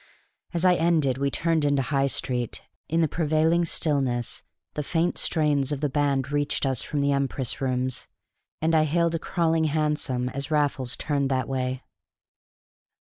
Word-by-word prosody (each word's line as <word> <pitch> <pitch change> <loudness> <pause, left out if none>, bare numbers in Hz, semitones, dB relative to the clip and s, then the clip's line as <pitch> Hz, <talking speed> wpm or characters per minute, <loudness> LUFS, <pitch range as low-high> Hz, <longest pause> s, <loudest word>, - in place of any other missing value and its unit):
As 170 +1 0
I 180 - +6
ended 160 -7 +2
we 140 0 +1
turned 160 +5 0
into 140 -2 +2
High 135 0 +1
Street; 125 -3 -1 0.3
in 165 +2 +2
the 160 - +3
prevailing 160 +2 +2
stillness, 135 -7 0 0.3
the 150 - -2
faint 165 +4 0
strains 150 -3 +1
of 145 - -2
the 145 0 0
band 140 -1 0
reached 145 0 0
us 130 -3 +1
from 145 - -2
the 140 0 +2
Empress 140 -1 -2
Rooms; 130 -1 -1 0.6
and 165 +1 +2
I 155 -1 +4
hailed 170 +2 +1
a 165 - -1
crawling 165 -1 +1
hansom 150 -5 0
as 140 +3 -4
Raffles 145 -5 0
turned 140 -3 -1
that 130 -1 0
way. 130 -1 -2
145 Hz, 160 wpm, -25 LUFS, 135-160 Hz, 0.6 s, I